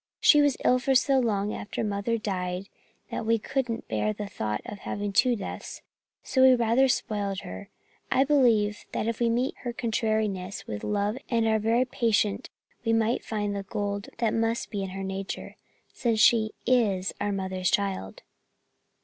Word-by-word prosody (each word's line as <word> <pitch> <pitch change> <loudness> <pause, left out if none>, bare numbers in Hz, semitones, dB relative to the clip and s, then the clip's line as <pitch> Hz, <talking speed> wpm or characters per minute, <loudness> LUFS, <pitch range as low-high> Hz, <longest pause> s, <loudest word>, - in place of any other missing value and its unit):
She 295 - +6
was 285 -3 +2
ill 255 - +5
for 265 +1 +1
so 270 +1 +4
long 210 -4 0
after 210 - -4
Mother 210 +2 -1
died 185 -2 -3 0.4
that - - -3
we 230 +1 +2
couldn't 245 0 -3
bear 215 - 0
the 210 0 -5
thought 105 - -3
of 205 - -7
having 205 0 -4
two 240 +3 +4
deaths, 205 - -7 0.4
and - - -20
so 260 - +2
we 260 -1 +8
rather 240 +3 +3
spoiled 205 -5 -1
her. 95 +1 -8 0.4
I 265 - +4
believe 235 -8 +3
that - - -1
if 230 -1 -2
we 235 -1 +2
meet 245 +3 0
her 245 - -4
contrariness 215 -5 -1
with 105 -1 -6
love 210 +3 -1
and 230 -2 +2
are 220 0 +3
very 230 +4 +2
patient 225 -5 0 0.3
we 225 -1 +1
may 225 +1 +2
find 205 -2 -3
the 200 - -2
gold 200 0 -3
that 230 -2 +1
must 225 +1 -1
be 205 -3 -2
in 195 - -3
her 195 +1 -5
nature, 195 0 -5 0.4
since 230 -4 0
she 220 0 +4
is 210 -7 +2
our 205 - 0
mother's 190 -2 -1
child." 195 - -2
215 Hz, 175 wpm, -27 LUFS, 200-235 Hz, 0.4 s, we